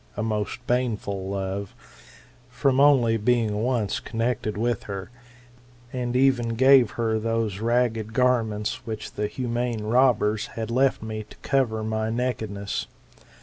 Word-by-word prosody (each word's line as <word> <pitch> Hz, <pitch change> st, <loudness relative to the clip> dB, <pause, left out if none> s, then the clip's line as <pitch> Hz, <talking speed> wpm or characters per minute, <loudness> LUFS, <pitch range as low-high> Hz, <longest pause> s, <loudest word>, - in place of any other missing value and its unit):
a 105 Hz, -, -1 dB
most 110 Hz, +3 st, -3 dB
baneful 105 Hz, -6 st, -1 dB
love] 95 Hz, 0 st, -4 dB, 0.7 s
from 130 Hz, +1 st, +1 dB
only 130 Hz, -6 st, +5 dB
being 110 Hz, -2 st, +1 dB
once 115 Hz, -5 st, 0 dB
connected 115 Hz, -2 st, -2 dB
with 120 Hz, 0 st, -1 dB
her: 95 Hz, -1 st, -6 dB, 0.8 s
and 125 Hz, -1 st, -2 dB
even 125 Hz, -3 st, +2 dB
gave 130 Hz, -1 st, +6 dB
her 110 Hz, -2 st, +1 dB
those 115 Hz, -3 st, -1 dB
ragged 115 Hz, -1 st, 0 dB
garments 115 Hz, -4 st, 0 dB
which 110 Hz, -1 st, -5 dB
the 105 Hz, -, -2 dB
humane 120 Hz, -2 st, -2 dB
robbers 110 Hz, -2 st, +2 dB
had 115 Hz, 0 st, -3 dB
left 130 Hz, -1 st, +2 dB
me 110 Hz, -1 st, -4 dB
to 105 Hz, -, -14 dB
cover 120 Hz, -6 st, +1 dB
my 110 Hz, 0 st, -1 dB
nakedness. 110 Hz, -4 st, -3 dB
115 Hz, 130 wpm, -25 LUFS, 105-125 Hz, 0.8 s, gave